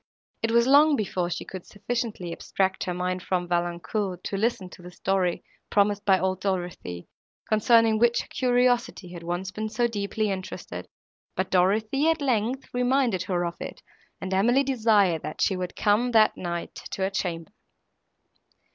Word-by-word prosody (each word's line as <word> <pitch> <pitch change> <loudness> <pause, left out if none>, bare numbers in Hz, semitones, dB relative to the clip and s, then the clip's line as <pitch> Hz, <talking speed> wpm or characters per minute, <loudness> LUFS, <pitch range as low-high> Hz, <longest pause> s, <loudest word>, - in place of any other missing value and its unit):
It 225 - 0
was 235 +1 +4
long 290 +3 +6
before 185 -6 -1
she 175 - -4
could 185 -2 -8
sufficiently 215 -5 -4
abstract 190 +2 -1
her 180 - -2
mind 180 0 -2
from 180 -1 -1
Valancourt 175 +2 -2
to - - -3
listen 200 -2 0
to - - -13
the 175 - -10
story, 185 -1 -1 0.3
promised 205 0 +2
by 195 -2 +5
old 190 0 -1
Dorothée, 175 - -3 0.4
concerning 220 0 +4
which 235 +1 +3
her - - -12
curiosity 245 -6 +1
had 175 -1 -9
once 175 +3 -3
been 215 +1 -4
so 225 +3 0
deeply 210 -1 -1
interested; 185 -1 -6 0.5
but 190 0 -2
Dorothée, 215 - +2
at 325 0 +1
length, 255 -1 0
reminded 245 -5 +2
her 175 -2 0
of 170 - -4
it, - - -7 0.4
and 190 0 -4
Emily 240 +8 +3
desired, 215 - +3
that 155 - -7
she 190 - +2
would 180 -1 -4
come, 215 +4 +2
that 215 -1 +5
night, 170 -1 -4
to 190 - -5
her 190 - 0
chamber. 175 -2 -3
200 Hz, 165 wpm, -26 LUFS, 180-230 Hz, 0.5 s, long